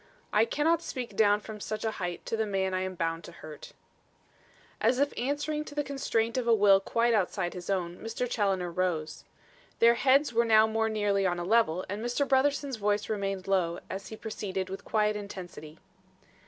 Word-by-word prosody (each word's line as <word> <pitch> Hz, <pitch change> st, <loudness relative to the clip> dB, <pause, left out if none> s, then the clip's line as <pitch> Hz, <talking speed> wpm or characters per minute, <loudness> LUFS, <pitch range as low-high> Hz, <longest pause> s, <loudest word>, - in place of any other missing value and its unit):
"I 215 Hz, +2 st, +5 dB
cannot 315 Hz, +7 st, +1 dB
speak 250 Hz, -9 st, -6 dB
down 205 Hz, -1 st, +4 dB
from 215 Hz, 0 st, -8 dB
such 215 Hz, +1 st, -4 dB
a 220 Hz, -, +1 dB
height 175 Hz, -1 st, -4 dB
to -, -, -2 dB
the 220 Hz, -1 st, -1 dB
man 190 Hz, -2 st, -1 dB
I 185 Hz, -, 0 dB
am 185 Hz, 0 st, -4 dB
bound 165 Hz, -1 st, -2 dB
to -, -, -10 dB
hurt." 155 Hz, -3 st, -11 dB, 1.1 s
As 235 Hz, +3 st, +3 dB
if 285 Hz, +1 st, +1 dB
answering 295 Hz, +4 st, -2 dB
to 290 Hz, -, -10 dB
the 295 Hz, -, 0 dB
constraint 245 Hz, -4 st, -1 dB
of 240 Hz, -, -4 dB
a 230 Hz, -, +6 dB
will 200 Hz, -2 st, +6 dB
quite 230 Hz, +4 st, +1 dB
outside 190 Hz, -3 st, 0 dB
his 180 Hz, 0 st, -8 dB
own, 180 Hz, -3 st, -1 dB
Mr. 225 Hz, +2 st, -3 dB
Challoner 195 Hz, -6 st, 0 dB
rose. 165 Hz, -3 st, -2 dB, 0.5 s
Their 235 Hz, 0 st, +6 dB
heads 270 Hz, +2 st, +3 dB
were 235 Hz, +1 st, +4 dB
now 220 Hz, -1 st, +6 dB
more 220 Hz, 0 st, 0 dB
nearly 205 Hz, -3 st, +1 dB
on 175 Hz, -1 st, -1 dB
a 175 Hz, -, -3 dB
level 185 Hz, -4 st, +2 dB
and 205 Hz, +3 st, -4 dB
Mr. 245 Hz, +4 st, 0 dB
Brotherson's 275 Hz, -1 st, +1 dB
voice 205 Hz, 0 st, 0 dB
remained 195 Hz, -3 st, -2 dB
low, 180 Hz, -3 st, +1 dB
as 195 Hz, +1 st, -5 dB
he 220 Hz, -, -7 dB
proceeded, 195 Hz, -4 st, -4 dB
with 195 Hz, -, -6 dB
quiet 210 Hz, -1 st, +1 dB
intensity. 180 Hz, -6 st, -8 dB
210 Hz, 195 wpm, -29 LUFS, 185-235 Hz, 1.1 s, a